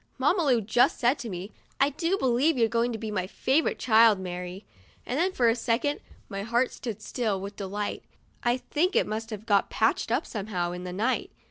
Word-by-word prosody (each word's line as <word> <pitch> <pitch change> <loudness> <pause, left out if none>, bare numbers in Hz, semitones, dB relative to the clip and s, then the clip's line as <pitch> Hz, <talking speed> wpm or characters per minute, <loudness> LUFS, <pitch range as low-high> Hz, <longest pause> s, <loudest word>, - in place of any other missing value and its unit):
Mamma 315 +7 +2
Lu 250 -5 +3
just 240 +5 +3
said 250 +4 +2
to 235 - -5
me, 185 +2 -6
" - - -35
I 275 +2 +4
do 335 +6 0
believe 265 +2 +2
you're 230 -2 +4
going 235 +2 0
to 225 - -3
be 220 0 -5
my 185 -3 -2
favorite 270 +9 +1
child, 225 -3 +5
Mary," 180 +1 -6 0.4
and 330 +10 0
for 240 - +3
a 230 - +4
second 250 +4 0 0.3
my 195 0 -5
heart 235 +4 +1
stood 220 -4 -6
still 220 -6 -1
with 200 +1 -7
delight 205 +1 -4 0.4
(I 240 +1 +2
think 340 +8 -1
it - - +4
must 220 +1 -4
have 215 -1 -7
got 200 -3 +2
patched - - +1
up - - +1
somehow, 195 -5 -3
in 180 +1 -6
the 180 - -4
night). 225 +7 0
230 Hz, 210 wpm, -27 LUFS, 200-255 Hz, 0.4 s, child